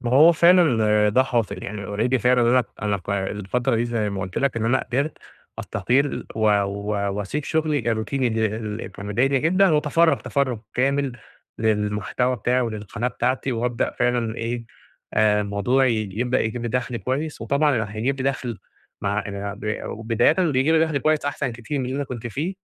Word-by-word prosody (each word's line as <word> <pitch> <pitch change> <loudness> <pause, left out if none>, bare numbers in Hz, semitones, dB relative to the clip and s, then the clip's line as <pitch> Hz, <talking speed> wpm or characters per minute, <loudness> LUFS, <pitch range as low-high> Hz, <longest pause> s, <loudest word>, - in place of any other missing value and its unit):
ما 120 -1 -2
هو 155 +6 +7
فعلًا 175 +2 +6 0.4
ال - - +3
ده 130 +5 +4
حاصل 120 -5 -2
يعني 100 -1 -6
already 110 +6 0
فعلًا، 125 +1 +3
أنا 125 -1 +4 0.2
أنا 105 -1 +1
ف 95 +2 -8
الفترة 105 +6 -1
دي 115 - +1
زي 115 -3 -1
ما 100 -1 -4
قُلت 95 -2 -4
لك 140 -4 0
إن 110 - -1
أنا 120 +3 +3
قدرت 140 +5 -2 0.4
أستقيل 140 +3 0
و 110 - -4 0.2
و 100 0 -2
وأسيب 105 +9 -3
شغلي 155 -1 0
الروتيني 125 +4 -1
اللي 110 -2 0
اللي 110 0 -5
كان 100 0 -9
مضايقني 130 +7 +2
جدًا، 185 +3 +4
وأتفرَّغ 155 +1 +3
تفرُّغ 130 -5 -1 0.2
كامل 135 0 +1 0.5
للمحتوى 110 +3 0
بتاعي 125 +4 +1
وللقناة 110 0 -3
بتاعتي، 125 +3 -1
وابدأ 120 0 -1
فعلًا 120 -2 0
إيه، 115 +1 -3 0.5
آآ، 105 -1 +3
الموضوع 105 +6 +1
يج 110 -4 -1
يبدأ 125 +1 +1
يجيب 115 +2 -2
لي 120 - -2
دخل 125 0 -2
كويس، 140 +3 -3
وطبعًا 135 -1 +1
هيجيب 120 +6 -1
لي - - 0
دخل 120 -6 -5 0.4
مع 100 +1 0
آآ، 100 0 -5
ب 105 +1 -4
وبدايةً 115 +4 +1
بيجيب 160 -3 +2
لي 160 - +4
دخل 155 -3 -1
كويس 155 +1 +1
أحسن 140 -3 -2
كتير 120 +5 -4
من 130 - -1
اللي 130 +2 -3
أنا 145 - -1
كنت 120 -3 -6
فيه، 155 - -3
120 Hz, 185 wpm, -23 LUFS, 105-135 Hz, 0.5 s, هو